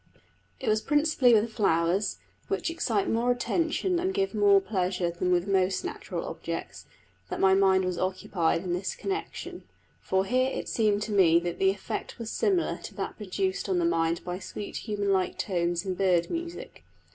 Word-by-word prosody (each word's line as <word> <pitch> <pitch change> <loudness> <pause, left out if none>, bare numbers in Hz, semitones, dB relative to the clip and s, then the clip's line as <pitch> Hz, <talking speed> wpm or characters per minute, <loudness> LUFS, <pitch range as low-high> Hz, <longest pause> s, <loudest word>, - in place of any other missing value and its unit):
It - - -6
was 215 0 +3
principally 295 -3 +3
with 220 +1 +1
flowers, 180 0 +1 0.3
which 395 -4 -1
excite 230 -11 0
more 235 +2 +1
attention 335 +7 0
and 375 +2 -1
give 390 -6 0
more 205 -2 +5
pleasure 185 -3 -1
than 175 +1 -2 0.2
most 190 - +1
natural 425 - -5
objects, - - -6 0.4
that - - -4
my 190 0 +5
mind 190 -1 +4
was 180 -1 -2
occupied 185 -3 0
in 180 -2 -2
this 185 +2 -2
connection; 395 +1 -5 0.4
for 190 0 0
here 255 +4 +2
it - - -4
seemed 210 -2 +1
to 215 - -5
me 175 -5 +5
that 175 -1 -4
the 190 - +4
effect 195 0 -4
was 230 -2 -5
similar 380 -4 +1
to - - -9
that - - -4
produced 195 -1 -2
on 185 - +2
the 175 - +2
mind 165 0 +1
by 180 0 -4
sweet 205 0 -6
human 205 -2 -1
like 185 -1 0
tones 175 -1 -1
in 190 - -1
bird 180 -2 +1
music. 340 +1 -6
195 Hz, 175 wpm, -28 LUFS, 185-245 Hz, 0.4 s, more